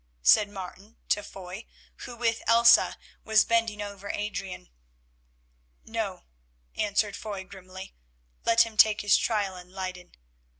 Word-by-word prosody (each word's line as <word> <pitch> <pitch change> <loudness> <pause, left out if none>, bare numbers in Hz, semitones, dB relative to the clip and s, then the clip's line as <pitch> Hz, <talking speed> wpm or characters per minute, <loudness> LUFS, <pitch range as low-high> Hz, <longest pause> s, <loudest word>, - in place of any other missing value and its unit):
said 200 - +5
Martin 195 +2 -10
to 205 - +2
Foy, 190 +1 -10 0.4
who 245 - -8
with 230 -1 0
Elsa 230 0 +6 0.3
was 220 -1 +4
bending 225 -2 0
over 200 -1 -8
Adrian. 200 -3 -5 1.2
"No," - - -4 0.5
answered 205 0 0
Foy 205 -3 -6
grimly, 190 0 -11 0.5
"let 230 0 +4
him 225 -1 -11
take 215 0 +5
his 205 -1 +4
trial 205 -4 0
in 180 0 -12
Leyden. 185 -1 -7
205 Hz, 125 wpm, -27 LUFS, 190-220 Hz, 1.2 s, Elsa